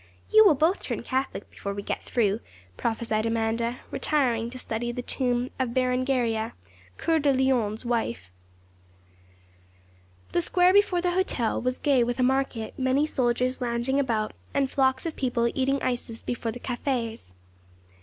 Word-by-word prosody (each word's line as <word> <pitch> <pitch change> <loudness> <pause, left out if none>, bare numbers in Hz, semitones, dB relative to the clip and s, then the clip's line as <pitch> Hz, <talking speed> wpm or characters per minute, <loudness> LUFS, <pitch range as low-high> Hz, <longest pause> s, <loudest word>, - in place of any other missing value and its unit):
'You 435 0 +8
will 375 -8 +6
both 320 +7 +2
turn - - -4
Catholic 265 -5 -2
before 200 0 -5
we 200 - -5
get - - -3
through,' 215 -3 0 0.4
prophesied 225 - -1
Amanda, 230 +1 -1
retiring 240 -6 +1
to 255 - -9
study 240 -1 -3
the 245 +1 -5
tomb 245 -1 0
of 250 -2 -1
Berengaria, 250 -3 +1 0.4
Coeur 325 -1 +2
de 285 -1 +3
Lion's 255 -4 +1
wife. 120 - -2 2.0
The 175 - +2
square 360 - +4
before 390 -3 +4
the 355 0 +1
hotel 350 - 0
was 255 +1 -1
gay 275 -5 +3
with 240 +1 -2
a - - +3
market, 260 -3 0
many 260 +3 +2
soldiers 255 -2 0
lounging 245 +3 0
about, 225 -6 0 0.2
and 275 -1 +1
flocks 265 0 +2
of 325 - -3
people 245 -3 0
eating 275 +1 +1
ices 240 -2 -3
before 235 -1 -3
the 245 - -8
cafés. 235 - -3
250 Hz, 150 wpm, -26 LUFS, 230-270 Hz, 2.0 s, You